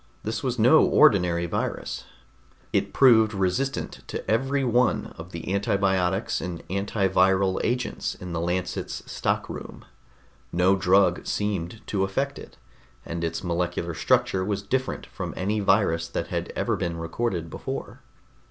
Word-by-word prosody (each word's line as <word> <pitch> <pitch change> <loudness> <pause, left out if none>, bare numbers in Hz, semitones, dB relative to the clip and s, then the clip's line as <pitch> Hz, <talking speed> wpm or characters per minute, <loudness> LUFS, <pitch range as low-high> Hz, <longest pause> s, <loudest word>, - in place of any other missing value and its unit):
This 110 0 -3
was 125 -2 -2
no 125 +8 +6
ordinary 90 - +4
virus. 85 - -3 0.7
It - - +1
proved 110 -5 +5
resistant 100 +9 -1
to - - -5
every 135 +5 +1
one 125 0 +1
of 85 +2 -10
the 85 +2 -4
antibiotics 95 -1 +1
and 90 -2 -6
antiviral 95 -1 +2
agents 125 +1 -1
in 90 -1 -7
the 85 - -1
Lancet's 90 +2 -2
stockroom. - - -3 0.7
No 90 +3 +3
drug 95 -1 +3
seemed 105 0 -2
to 95 -2 0
affect 135 +9 -1
it, - - -12 0.5
and 85 0 -4
its 85 +2 -2
molecular 85 -1 -1
structure 120 +2 +2
was 100 0 -2
different 130 +5 -2
from - - -6
any 105 +3 0
virus 95 -5 +2
that 85 - -4
had - - -3
ever - - 0
been 85 -1 -3
recorded 85 0 -2
before. - - -6
95 Hz, 135 wpm, -25 LUFS, 90-110 Hz, 0.7 s, no